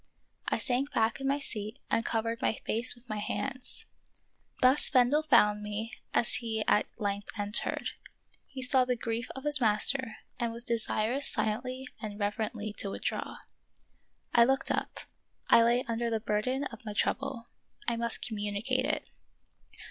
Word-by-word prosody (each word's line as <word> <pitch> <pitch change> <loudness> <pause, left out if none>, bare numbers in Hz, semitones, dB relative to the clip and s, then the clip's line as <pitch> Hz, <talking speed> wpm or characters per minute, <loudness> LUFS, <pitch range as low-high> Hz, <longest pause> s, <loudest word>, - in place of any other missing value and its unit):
I - - +1
sank 260 +3 -1
back 225 +3 +1
in 270 - -2
my 280 +1 +2
seat 215 -4 -5
and 230 - +2
covered 230 0 -2
my - - +2
face 235 +3 +4
with 240 +1 -17
my 215 -2 -4
hands. 255 +4 -4 0.7
Thus 255 +3 +6
Bendel 260 +3 +4
found 210 -8 +4
me 210 +2 -5 0.2
as 235 - +1
he 220 -2 -2
at 210 - +3
length 200 -2 -3
entered. 205 +1 0 0.6
He 260 -1 -6
saw 255 0 +6
the 250 0 0
grief 230 +1 -3
of 265 - -7
his 295 -2 +5
master 225 +2 +4 0.2
and 235 -1 -1
was 235 +1 0
desirous 235 +3 0
silently 255 +4 -1
and 210 -2 -6
reverently 210 +1 -3
to 200 - -2
withdraw. - - -4 1.0
I 235 - +7
looked 270 +3 +1
up; - - -3 0.5
I - - +7
lay 240 +2 +3
under 230 0 -1
the 225 -1 -1
burden 220 +6 -1
of 240 -5 -7
my 210 -2 -6
trouble; 235 +3 -2 0.4
I 235 - +1
must 235 0 -2
communicate 220 +4 -1
it. 305 +2 -2
235 Hz, 155 wpm, -30 LUFS, 215-255 Hz, 1.0 s, I